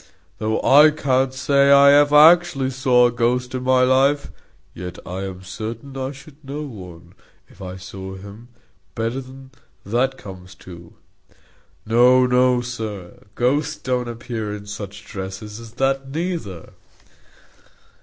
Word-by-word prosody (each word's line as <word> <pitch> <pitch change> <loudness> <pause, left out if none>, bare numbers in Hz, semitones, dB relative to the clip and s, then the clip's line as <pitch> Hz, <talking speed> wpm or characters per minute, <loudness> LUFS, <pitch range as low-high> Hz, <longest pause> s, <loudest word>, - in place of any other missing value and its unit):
Though 110 0 -1
I 150 +3 +7
can't 135 -3 0
say 140 +1 +2
I 140 0 +7
ever 145 +1 +4
actually 155 -3 +5
saw 125 -2 +3
a 120 - +2
ghost 125 +1 -1
in 130 - -3
my 130 0 +3
life, 135 +3 +2 0.4
yet 90 0 -8
I 95 +2 -5
am 95 -1 -8
certain 115 +8 -7
I 135 0 -4
should 145 +2 -16
know 140 +3 -6
one, 90 - -11 0.3
if 100 - -19
I 90 -1 -7
saw 95 +1 -9
him, 100 +5 -12 0.5
better 115 +3 -2
than 130 +1 -14 0.3
that 125 +6 0
comes 95 -2 -12
to. 85 -2 -13 0.9
No, 125 +3 +4
no, 125 0 +2
sir, 110 -7 -7
ghosts 145 +5 0
don't 125 -3 -3
appear 115 -3 -5
in 100 -1 -10
such 100 0 -8
dresses 100 +2 -8
as 115 -1 -12
that, 135 +1 -1
neither." 155 - -5
125 Hz, 140 wpm, -21 LUFS, 100-135 Hz, 0.9 s, I